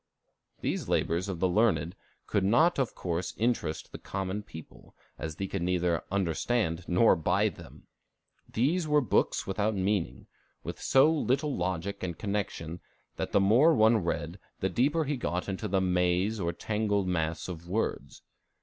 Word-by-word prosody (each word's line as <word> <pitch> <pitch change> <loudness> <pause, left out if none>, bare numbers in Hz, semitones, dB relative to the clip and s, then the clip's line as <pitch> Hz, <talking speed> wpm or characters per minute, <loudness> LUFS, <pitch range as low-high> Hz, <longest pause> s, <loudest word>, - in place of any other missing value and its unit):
These - - -2
labors 85 +4 0
of 90 -4 -4
the 95 - +3
learned 90 -4 +2 0.3
could 100 - 0
not 145 - +4
of 130 -4 -1
course 85 0 -3
interest 110 -9 -1
the - - -8
common 95 +1 -3
people, 80 -6 -13 0.2
as 80 -2 -4
they 100 - -3
could 95 -1 -4
neither 90 -2 0
understand 95 0 0
nor 90 +5 +5
buy 90 +6 +2
them. 90 - -14 0.7
These 155 +9 +1
were 150 0 +4
books 130 - +1
without 105 +2 0
meaning, 95 - -1 0.4
with - - -6
so 140 +4 +5
little 145 -1 0
logic 90 +2 -3
and 85 -3 -4
connection 100 -5 -3 0.4
that - - -3
the - - +4
more 120 +12 +5
one 110 0 +5
read, 85 - -3 0.2
the 95 - 0
deeper 140 - +2
he 145 -1 -2
got 90 -7 -2
into 100 +2 -3
the 95 -1 +1
maze 90 +3 +1
or 85 -2 0
tangled 105 +1 -1
mass 80 -2 -1
of 85 -1 -8
words. 110 +5 -3
95 Hz, 160 wpm, -29 LUFS, 90-110 Hz, 0.7 s, nor